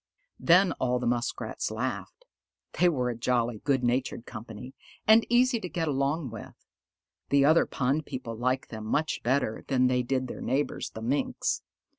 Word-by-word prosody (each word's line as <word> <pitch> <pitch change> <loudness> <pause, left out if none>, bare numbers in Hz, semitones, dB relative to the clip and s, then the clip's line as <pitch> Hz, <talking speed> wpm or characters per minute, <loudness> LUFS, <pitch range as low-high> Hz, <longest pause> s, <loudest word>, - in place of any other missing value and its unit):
Then 180 +2 +5
all 125 -1 +1
the 125 - -3
Muskrats 120 0 -2
laughed. - - -4 0.5
They 180 - +6
were 125 -6 0
a - - -5
jolly, 120 -1 0
good 135 -3 +1
natured 120 -1 -1
company, 115 +2 -9 0.3
and 220 +1 +6
easy 245 0 +3
to 180 - -6
get 165 -2 -2
along 140 0 -1
with. 115 - -9 0.7
The 140 0 +4
other 160 +3 +5
pond 140 +4 -1
people 130 -4 -5
liked 130 +3 -1
them 110 -1 -6
much 155 +7 0
better 125 -3 0
than 130 -2 +2
they 125 0 +2
did 130 +1 -1
their - - -7
neighbors, 135 +4 -1
the 110 - -9
Minks. 135 +5 -1
130 Hz, 165 wpm, -28 LUFS, 120-155 Hz, 0.7 s, They